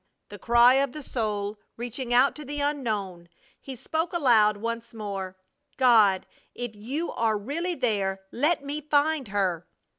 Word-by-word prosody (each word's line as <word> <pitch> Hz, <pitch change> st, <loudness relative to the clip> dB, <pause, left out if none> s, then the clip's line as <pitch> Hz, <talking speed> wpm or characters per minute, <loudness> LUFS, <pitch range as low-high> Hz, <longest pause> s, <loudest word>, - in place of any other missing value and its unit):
the 205 Hz, -, -10 dB
cry 240 Hz, +3 st, +5 dB
of 270 Hz, -1 st, +1 dB
the 300 Hz, -, -8 dB
soul 210 Hz, -4 st, -3 dB, 0.2 s
reaching 245 Hz, +1 st, -5 dB
out 250 Hz, +3 st, +5 dB
to 300 Hz, -, -8 dB
the 290 Hz, +1 st, -5 dB
unknown, 215 Hz, -12 st, -2 dB, 0.3 s
he 270 Hz, -, -8 dB
spoke 320 Hz, +7 st, -3 dB
aloud 225 Hz, -10 st, +4 dB
once 230 Hz, +2 st, -5 dB
more: 195 Hz, -3 st, -5 dB, 0.4 s
"God, 220 Hz, -7 st, +5 dB, 0.3 s
if 240 Hz, -3 st, -5 dB
You 270 Hz, +11 st, -4 dB
are 220 Hz, -2 st, 0 dB
really 325 Hz, -, -3 dB
there, 200 Hz, -7 st, -1 dB
let 295 Hz, +4 st, +1 dB
me 290 Hz, +2 st, -4 dB
find 295 Hz, -2 st, +1 dB
her!" 190 Hz, -4 st, -1 dB
240 Hz, 150 wpm, -26 LUFS, 205-280 Hz, 0.4 s, cry